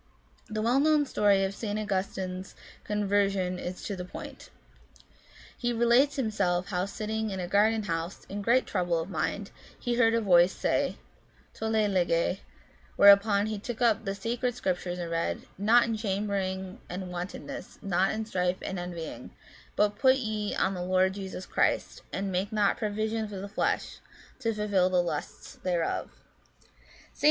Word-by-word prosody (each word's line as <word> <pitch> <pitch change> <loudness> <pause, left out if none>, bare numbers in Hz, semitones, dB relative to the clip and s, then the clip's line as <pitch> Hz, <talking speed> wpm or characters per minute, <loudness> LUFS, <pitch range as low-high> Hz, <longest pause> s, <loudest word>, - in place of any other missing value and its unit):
The 215 0 -2
well 245 +4 +3
known 300 0 +4
story 205 -6 +3
of 195 0 -1
St. 210 0 -3
Augustine's 190 -2 -3 0.3
conver 205 -1 +2
sion 185 -2 -2
is 180 +1 -6
to 200 - -3
the 180 - -5
point. 180 - -9 1.1
He 240 -1 -1
relates 235 +5 +4
himself 200 -7 0
how 180 0 -1
sitting 220 +2 -3
in 190 -2 -4
a 180 - -3
garden 215 +3 +3
house, 165 -1 -4
in 205 +1 -5
great 240 +5 +3
trouble 175 -1 0
of 165 +4 -5
mind, 200 +2 -2 0.3
he 240 - -1
heard 230 -1 +4
a - - +3
voice 180 -3 +5
say, - - 0 0.3
" - - -33
ToUe, 220 -1 +1
lege 175 0 +1 0.3
"; - - -30
whereupon 200 0 +6
he 215 -1 -3
took 235 +3 -6
up 230 -3 +3
the 195 0 -2
sacred 235 +4 -2
Scriptures 180 -4 -2
and 170 -1 -4
read, 165 0 -1
" - - -31
Not 230 +4 +5
in 230 -1 -1
chambering 195 -1 -2
and 180 0 -5
wantonness, 180 +2 -6
not 190 -1 +2
in 220 0 -3
strife 180 -3 0
and 190 - -3
envying; 175 -2 -6 0.5
but 205 0 +1
put 260 0 +6
ye 215 -5 -2
on 190 - +1
the 180 - -4
Lord 185 +1 +2
Jesus 190 -1 -6
Christ, - - 0
and 195 0 -2
make 190 +3 -1
not 210 -2 +2
provision 215 0 -1
for 205 -1 -7
the 195 +2 -5
flesh, 200 - -1 0.4
to 230 -3 0
fulfil 205 -4 +2
the 185 - +1
lusts 175 - -5
thereof" 175 -3 0
(Rom. - - -25 0.5
xiii. - - -30 0.4
St. - - -26
200 Hz, 175 wpm, -29 LUFS, 185-220 Hz, 1.1 s, whereupon